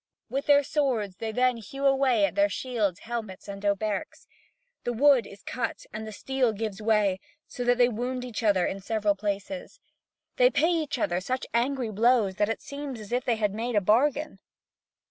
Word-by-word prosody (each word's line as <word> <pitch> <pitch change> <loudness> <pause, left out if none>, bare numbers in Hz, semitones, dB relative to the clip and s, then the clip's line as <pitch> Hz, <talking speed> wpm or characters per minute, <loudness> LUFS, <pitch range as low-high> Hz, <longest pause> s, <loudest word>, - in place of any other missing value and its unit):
With 275 +1 -2
their 285 0 +6
swords 250 -10 -1
they 225 -1 -3
then 250 +1 +2
hew 275 +6 -6
away 265 -6 +4
at - - -3
their 300 0 +3
shields, 220 - -2
helmets, 220 -5 -6
and 200 0 -7
hauberks. 205 0 -2 0.6
The 240 - -1
wood 265 -1 +4
is 200 - -14
cut 240 -2 -4
and 220 +1 -5
the - - -6
steel 255 +2 0
gives 215 -1 -4
way, 210 -3 +2 0.3
so 245 - -6
that 245 0 +3
they 245 -1 +6
wound 250 +2 -3
each 245 -2 -5
other 200 -5 +3
in 195 - -3
several 210 0 +1
places. 205 +7 -4 0.6
They - - +6
pay 335 -7 +2
each 315 -5 -1
other 175 -6 0
such 255 +6 -2
angry 245 0 0
blows 220 -2 +3
that 205 0 +2
it 225 - -3
seems 280 -3 -6
as 210 0 -10
if 245 +1 0
they 240 - +2
had 210 -2 0
made 230 +2 -3
a - - +6
bargain. 275 +9 +2
230 Hz, 190 wpm, -27 LUFS, 210-260 Hz, 0.6 s, their